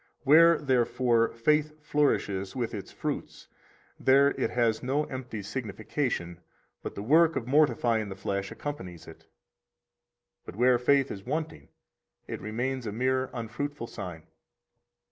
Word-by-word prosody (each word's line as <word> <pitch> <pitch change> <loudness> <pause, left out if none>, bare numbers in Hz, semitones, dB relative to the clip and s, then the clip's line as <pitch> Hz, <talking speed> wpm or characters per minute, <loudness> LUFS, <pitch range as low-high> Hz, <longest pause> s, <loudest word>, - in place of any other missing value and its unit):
73 145 +2 +6
Where, 165 0 +7
therefore, 120 -3 +2
faith 150 +5 +1
flourishes 135 -10 0
with 120 -3 -2
its - - -6
fruits, - - -5 0.5
there 140 +2 +5
it - - -1
has 115 -2 +1
no 135 +4 0
empty 130 -7 -6
signification, 105 - -3 0.4
but - - -6
the 100 - -5
work 160 +7 +4
[of 115 - -2
mortifying 120 -6 +2
the 95 - -6
flesh] 100 0 -3
accompanies 95 - -7
it; - - -14 1.2
but - - -10
where 125 +2 +4
faith 140 +2 +3
is 95 - -7
wanting, 150 - -4 0.6
it - - -6
remains 120 +4 -3
a - - -2
mere 130 +3 0
unfruitful 125 +3 -4
sign. 90 -8 -8
125 Hz, 135 wpm, -28 LUFS, 110-145 Hz, 1.2 s, Where